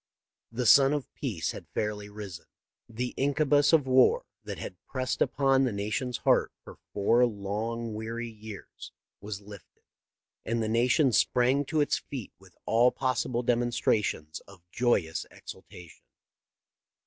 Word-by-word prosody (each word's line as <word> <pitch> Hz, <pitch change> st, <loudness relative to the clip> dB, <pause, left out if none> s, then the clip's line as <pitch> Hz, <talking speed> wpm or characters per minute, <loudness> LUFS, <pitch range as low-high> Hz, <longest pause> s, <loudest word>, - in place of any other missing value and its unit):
"The 120 Hz, +2 st, -2 dB
sun 135 Hz, +3 st, +7 dB
of 145 Hz, -3 st, -4 dB
peace 100 Hz, -, -3 dB
had -, -, -10 dB
fairly 105 Hz, -1 st, -2 dB
risen. 100 Hz, -5 st, -9 dB, 0.4 s
The 120 Hz, +2 st, -4 dB
incubus 145 Hz, +1 st, +3 dB
of 160 Hz, -4 st, +4 dB
war 135 Hz, -, +4 dB, 0.2 s
that -, -, -6 dB
had -, -, -8 dB
pressed 130 Hz, -1 st, -3 dB
upon 135 Hz, -1 st, +3 dB
the 130 Hz, -, +1 dB
nation's 110 Hz, +5 st, -2 dB
heart -, -, +2 dB
for -, -, -13 dB
four 115 Hz, +5 st, +3 dB
long, 110 Hz, +2 st, -4 dB
weary 115 Hz, +2 st, -4 dB
years 110 Hz, -2 st, -10 dB, 0.3 s
was 105 Hz, 0 st, -6 dB
lifted; 100 Hz, -2 st, -14 dB, 0.6 s
and 115 Hz, +1 st, -1 dB
the -, -, -1 dB
nation 125 Hz, +5 st, +3 dB
sprang 125 Hz, +4 st, +2 dB
to 155 Hz, +2 st, 0 dB
its 145 Hz, -, +1 dB
feet 130 Hz, -7 st, -8 dB
with 95 Hz, -2 st, -20 dB
all 120 Hz, +2 st, +4 dB
possible 130 Hz, -2 st, -1 dB
demonstrations 115 Hz, -9 st, 0 dB
of 100 Hz, -3 st, -16 dB
joyous 95 Hz, -10 st, 0 dB
exultation." 90 Hz, -2 st, -12 dB
115 Hz, 135 wpm, -28 LUFS, 105-130 Hz, 0.6 s, sun